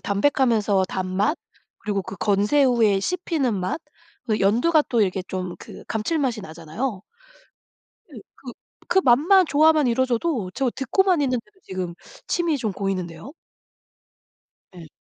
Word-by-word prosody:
담백하면서 210 -3 +2
단맛 190 - -1 0.4
그리고 205 -2 -2
그 195 +1 -8
건새우의 210 +1 +2
씹히는 320 - -1
맛 185 - -3 0.5
그 215 -2 0
연두가 245 +12 +3
또 235 -3 +2
이렇게 190 -1 0
좀 185 -1 -4
그 - - -12
감칠맛이 245 +1 -1
나잖아요. 190 +5 -5 1.1
예. 225 - -9 0.2
그 250 -3 -10 0.3
그 380 - +3
맛만 335 +9 +5
조화만 310 0 +4
이뤄져도 245 - 0
저 265 -3 0
듣고만 340 +7 +1
있는데도 270 - -3
지금 185 -2 -5 0.3
침이 335 -4 0
좀 220 -4 -2
고이는데요. 185 - -4 1.4
예. 170 - -10
230 Hz, 270 characters per minute, -23 LUFS, 195-285 Hz, 1.4 s, 맛만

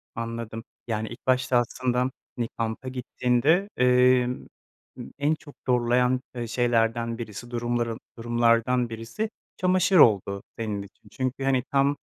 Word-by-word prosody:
Anladım, 115 -1 -5 0.2
yani 110 -1 -2
ilk 120 +3 -12
başta 130 0 +3
aslında 125 +1 0 0.3
bir 120 -1 -2
kampa 115 +3 -3
gittiğinde, 125 +8 +1
emm, 125 0 +3 0.5
ımm 70 - -8
en 150 +2 +2
çok 150 -2 -15
zorlayan, 125 +1 +2
eee, 120 -1 -3
şeylerden 115 -1 +1
birisi, 120 +1 -7
durumların 120 -1 -1 0.2
durumlardan 120 +1 +2
birisi 115 - -4 0.3
çamaşır 185 +1 +3
oldu 100 -5 +4
senin 105 -3 -3
için. 100 0 -15
Çünkü 130 +1 -3
hani 135 -2 +2
tam, 140 +1 +3
120 Hz, 130 wpm, -26 LUFS, 115-130 Hz, 0.5 s, oldu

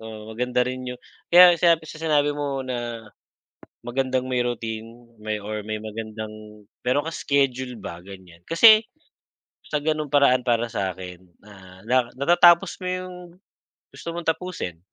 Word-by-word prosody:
oo, 110 -1 -10
maganda 125 +2 -1
rin 130 0 -5
yung 125 0 -7 0.3
kaya 175 0 +9
sinabi 165 -1 +3
sa - - -9
sinabi 150 -3 +2
mo 140 -2 -3
na 120 -3 -5 0.8
magandang 130 +1 -1
may 125 - 0
routine 115 -2 -4 0.3
may 110 0 -3
or 105 +1 -5
may 110 0 -3
magandang 110 -1 -8 0.2
meron 135 +4 +2
kang 165 - -4
schedule 130 -3 0
ba, 85 -3 -7
ganyan. 95 -3 -13
Kasi 215 +6 +7 0.8
sa 150 -1 -2
ganung 155 -2 -1
paraan 140 -3 +4
para 120 -1 +1
sa 95 -2 -2
akin 90 -1 -9 0.3
ah, 95 -2 -15
na 125 -1 +2
natatapos 175 +5 +4
mo - - -4
yung 185 0 -5 0.8
gusto 170 - -7
mong 170 -1 -6
tapusin 160 - -5
125 Hz, 150 wpm, -23 LUFS, 110-150 Hz, 0.8 s, kaya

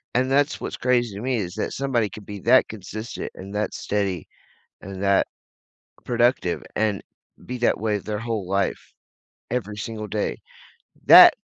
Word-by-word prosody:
and 130 +1 +2
that's 145 +2 +2
what's - - -4
crazy 120 -4 +1
to 100 - -6
me 125 0 0
is 90 -4 -3
that - - -2
somebody 125 -6 0
could 105 +2 -11
be 105 -1 -7
that 125 +5 +5
consistent 110 +2 -6
and 100 +2 -9
that 105 +1 -1
steady 100 -5 -2 0.5
and 95 0 -7
that 100 0 +3 0.8
productive 120 -7 +1
and 105 -2 +1 0.4
be 125 0 -4
that 120 - +2
way 105 -1 0
their 105 +1 -4
whole 115 -4 -3
life, 100 0 -1 0.6
every 110 -4 -2
single 110 +1 -5
day. 105 +1 -2 0.7
That, - - +11
110 Hz, 155 wpm, -24 LUFS, 100-120 Hz, 0.8 s, That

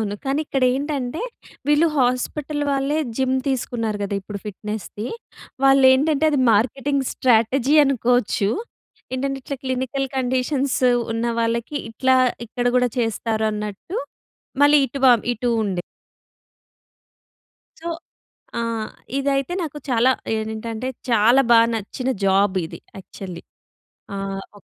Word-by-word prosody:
అవును. 205 -2 -2
కానీ 275 +3 0
ఇక్కడేంటంటే, 270 - 0 0.5
వీళ్ళు 295 +3 +4
హాస్పటల్ 275 +4 0
వాళ్ళే 275 +2 0 0.2
జిమ్ 260 0 +1
తీసుకున్నారు 235 -5 -1
గదా 200 0 -2
ఇప్పుడు 200 +1 -7
ఫిట్‍నెస్‌ది. 210 +2 -6 0.6
వాళ్ళేంటంటే, 270 +3 +5
అది 285 - +1
మార్కెటింగ్ 270 +6 +1
స్ట్రాటజీ 255 +3 +3
అనుకోచ్చు. 245 -6 +1 0.6
ఏంటంటే, 270 +1 -2
ఇట్లా 280 0 -5
క్లినికల్ 260 +1 -1
కండిషన్స్ 260 +2 0 0.3
ఉన్న 230 +1 -2 0.2
వాళ్ళకి 230 +5 -1
ఇట్లా 260 +3 +2 0.3
ఇక్కడ 245 +2 -3
గూడా 250 0 +3
చేస్తారు 225 -1 0
అన్నట్టూ, 210 - -5 0.7
మళ్ళీ 295 +1 +7
ఇటు 275 +3 -6
వా 250 - +9 0.2
ఇటూ 245 +1 -2 0.2
ఉండే. 185 -3 -2 2.0
సో 340 - -5 0.7
ఆ! - - 0 0.6
ఇదైతే 275 +3 0
నాకు 300 -2 -5
చాలా 245 +1 +4 0.2
ఏనింటంటే, 220 +2 -4 0.2
చాలా 230 +4 +5
బా 230 - +8 0.2
నచ్చిన 225 +4 -4 0.2
జాబిది 190 -3 +1 0.2
యాక్చల్లీ. 185 -2 -9 0.7
ఆ! - - -3 0.4
ఒ - - -14
250 Hz, 110 wpm, -22 LUFS, 220-275 Hz, 2.0 s, వా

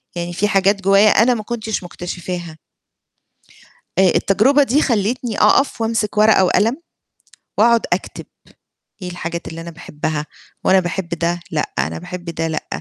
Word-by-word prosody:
يعني 175 0 -4
فيه 195 +4 0
حاجات 200 -1 +2
جوايا 195 +2 +5
أنا 230 +4 +4
ما 220 -3 -4
كنتش 220 -3 -4
مكتشفاها. 175 -2 -6 1.4
آآ، 190 -2 +5
التجربة 265 +9 +3
دي 280 +4 +2
خلّتني 230 0 -1
أقَف 275 -4 +3
وامسِك 225 -2 -1
ورقة 215 -2 +5
وقلم 225 +8 +2 0.8
واقعد 230 +2 +4
أكتب، - - -5 0.8
إيه 180 - -5
الحاجات 170 -1 -5
اللي 165 0 -7
أنا 170 - -8
باحبها؟ 150 -2 -4 0.4
وأنا 190 0 +4
باحب 175 0 -4
ده 170 0 -1
لأ، 150 -2 -2
أنا - - -2
باحب 180 0 -8
ده 165 -1 -3
لأ، 160 - -4
190 Hz, 145 wpm, -19 LUFS, 175-220 Hz, 1.4 s, جوايا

